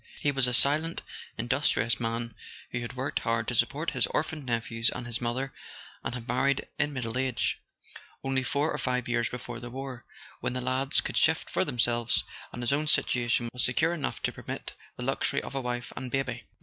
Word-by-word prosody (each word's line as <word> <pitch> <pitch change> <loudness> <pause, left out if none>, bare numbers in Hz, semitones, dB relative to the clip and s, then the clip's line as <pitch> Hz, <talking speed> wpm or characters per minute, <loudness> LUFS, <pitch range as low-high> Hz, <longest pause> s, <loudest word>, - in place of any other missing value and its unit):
He 145 - +2
was 135 -2 +3
a 125 - +1
silent 155 +6 +4 0.3
industrious 115 -2 +2
man, 115 0 -2 0.4
who 120 - -1
had 120 - -5
worked 130 +2 -1
hard 115 -1 0
to - - 0
support 140 +7 +1
his - - +2
orphaned 155 -3 -2
nephews 115 -1 +2
and 125 - -5
his 120 0 -1
mother, 130 +3 -1 0.5
and 120 - -2
had 120 -1 -7
married 135 +2 +2
in 150 0 +2
middle 125 -2 -2
age, 130 -3 +1 0.6
only 135 -1 +1
four 140 +4 +1
or - - -2
five 125 -1 0
years 120 -1 +1
before 120 -1 -6
the 120 - -7
war, 130 -1 -6 0.4
when - - -1
the 125 - -1
lads 130 +2 +3
could - - -3
shift - - +3
for - - +2
themselves, 120 -1 +2 0.3
and 120 - -5
his 120 - +3
own 150 +2 +1
situation 120 -4 +3
was 125 - 0
secure 160 +7 +3
enough 150 -6 -3
to - - +1
permit - - -6 0.2
the - - -4
luxury - - +1
of - - -7
a 135 - -1
wife 120 -1 -3
and 130 -1 -4
baby. 125 -2 -2
125 Hz, 200 wpm, -29 LUFS, 120-135 Hz, 0.6 s, silent